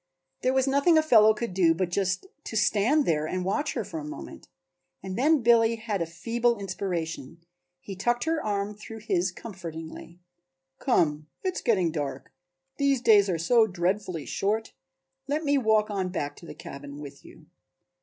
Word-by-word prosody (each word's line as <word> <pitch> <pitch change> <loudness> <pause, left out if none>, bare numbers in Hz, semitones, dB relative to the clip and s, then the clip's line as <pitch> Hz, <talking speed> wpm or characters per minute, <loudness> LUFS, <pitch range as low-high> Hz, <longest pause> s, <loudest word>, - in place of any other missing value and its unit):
There 255 +1 +1
was 265 -1 +3
nothing 280 +5 +4
a 315 - +4
fellow 220 -8 +6
could 225 -3 -4
do 170 -3 +3
but 180 0 -2
just 185 - -1 0.2
to - - -6
stand 220 +7 +3
there 155 -1 +1
and 180 +2 -3
watch 285 +10 -1
her - - -1
for 325 - -6
a - - -7
moment 300 +1 -9 0.6
and 190 -1 -5
then 290 +3 +3
Billy 230 -1 +5
had 220 -4 -3
a 165 - -1
feeble 230 +7 0
inspiration. 175 -6 -4 0.4
He 195 - -7
tucked 240 +6 0
her 320 -1 -1
arm 205 0 -2
through 220 +1 -10
his 185 -3 0
comfortingly. 170 -4 -9 0.6
"Come, 155 - +1 0.2
it 375 -1 0
is - - -5
getting 190 -8 +2
dark, 145 -3 -5 0.5
these 280 -2 +2
days 210 -4 +5
are 175 - 0
so 225 +7 +4
dreadfully 180 -2 -2
short. 215 +3 -2 0.5
Let 295 +3 -1
me 285 -1 +3
walk 220 -3 +2
on 190 -2 -1
back 145 -5 -3
to 170 - -12
the - - -9
cabin 140 +1 -9
with 140 -2 -10
you." - - -16
205 Hz, 175 wpm, -27 LUFS, 175-240 Hz, 0.6 s, fellow